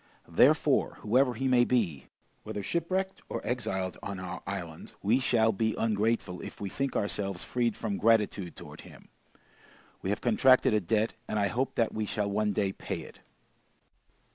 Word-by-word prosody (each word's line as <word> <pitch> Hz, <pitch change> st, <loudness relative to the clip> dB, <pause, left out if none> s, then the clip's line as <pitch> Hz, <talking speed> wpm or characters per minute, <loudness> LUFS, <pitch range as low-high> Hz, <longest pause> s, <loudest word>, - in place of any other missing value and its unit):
Therefore, -, -, +3 dB
whoever 125 Hz, +3 st, +3 dB
he 135 Hz, +4 st, -1 dB
may 125 Hz, -2 st, +5 dB
be, 100 Hz, -, 0 dB, 0.3 s
whether 100 Hz, -, -5 dB
shipwrecked, 185 Hz, -, -1 dB
or -, -, -2 dB
exiled 95 Hz, -7 st, -2 dB
on 100 Hz, -2 st, -5 dB
our 90 Hz, 0 st, -6 dB
island, 90 Hz, -5 st, -6 dB
we 115 Hz, +6 st, +3 dB
shall 115 Hz, -3 st, +3 dB
be 110 Hz, +1 st, 0 dB
ungrateful, 110 Hz, -4 st, 0 dB
if -, -, -9 dB
we 100 Hz, -, -4 dB
think 135 Hz, +7 st, -2 dB
ourselves 100 Hz, -2 st, -1 dB
freed 120 Hz, -3 st, 0 dB
from 105 Hz, -3 st, -3 dB
gratitude 105 Hz, -5 st, +2 dB
towards -, -, -10 dB
him. -, -, -15 dB, 0.9 s
We 95 Hz, -, -3 dB
have 105 Hz, -, 0 dB
contracted 130 Hz, +1 st, +4 dB
a 105 Hz, -, +3 dB
debt, 110 Hz, +5 st, +1 dB
and 110 Hz, -, -2 dB
I 100 Hz, -1 st, +2 dB
hope 130 Hz, +4 st, -1 dB
that 115 Hz, -2 st, +1 dB
we 110 Hz, -1 st, -2 dB
shall 105 Hz, -1 st, -1 dB
one 105 Hz, +1 st, +1 dB
day 100 Hz, -1 st, 0 dB
pay -, -, -5 dB
it." -, -, -13 dB
110 Hz, 165 wpm, -29 LUFS, 100-120 Hz, 0.9 s, may